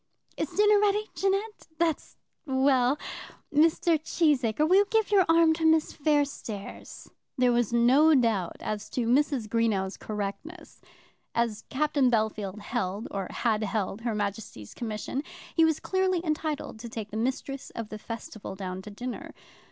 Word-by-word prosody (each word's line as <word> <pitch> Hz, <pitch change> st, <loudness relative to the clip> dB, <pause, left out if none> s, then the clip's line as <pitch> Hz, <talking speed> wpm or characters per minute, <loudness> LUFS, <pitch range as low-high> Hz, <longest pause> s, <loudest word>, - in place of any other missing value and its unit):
Is -, -, -2 dB
dinner 420 Hz, 0 st, +4 dB
ready, 420 Hz, +1 st, +1 dB
Jeannette? 395 Hz, +3 st, -1 dB
That's 330 Hz, -1 st, -1 dB, 0.3 s
well. 265 Hz, 0 st, +3 dB, 0.6 s
Mr. 320 Hz, +2 st, +3 dB
Cheesacre, 300 Hz, -5 st, +2 dB
will 370 Hz, +3 st, +5 dB
you 405 Hz, -, +5 dB
give 445 Hz, -2 st, +1 dB
your 390 Hz, -3 st, +5 dB
arm 330 Hz, -1 st, +5 dB
to 320 Hz, +1 st, -4 dB
Miss 320 Hz, -1 st, +3 dB
Fairstairs?" 285 Hz, -9 st, -3 dB, 0.3 s
There 250 Hz, -1 st, +4 dB
was 240 Hz, -2 st, +1 dB
no 260 Hz, +7 st, +5 dB
doubt 220 Hz, -9 st, +1 dB
as 210 Hz, 0 st, -4 dB
to 245 Hz, -, -1 dB
Mrs. 260 Hz, -1 st, +2 dB
Greenow's 210 Hz, -4 st, 0 dB
correctness. 215 Hz, -, -6 dB, 0.5 s
As 230 Hz, -2 st, -1 dB
Captain 285 Hz, -2 st, +2 dB
Bellfield 215 Hz, -3 st, -1 dB
held, 205 Hz, -2 st, -3 dB
or 195 Hz, -2 st, -3 dB
had 225 Hz, -3 st, 0 dB
held, 205 Hz, 0 st, -2 dB
her 230 Hz, -2 st, -2 dB
Majesty's 200 Hz, -, -4 dB
commission, 225 Hz, +3 st, -4 dB, 0.3 s
he 330 Hz, -, +4 dB
was 320 Hz, -1 st, +3 dB
clearly 375 Hz, -2 st, 0 dB
entitled 305 Hz, -6 st, -2 dB
to 235 Hz, +1 st, -7 dB
take 220 Hz, -2 st, -6 dB
the -, -, -7 dB
mistress 265 Hz, +3 st, -3 dB
of 230 Hz, -2 st, -5 dB
the 215 Hz, -, -7 dB
festival 220 Hz, -3 st, -7 dB
down 185 Hz, -1 st, -5 dB
to 210 Hz, -, -10 dB
dinner. 245 Hz, +5 st, -7 dB
250 Hz, 150 wpm, -28 LUFS, 215-315 Hz, 0.6 s, will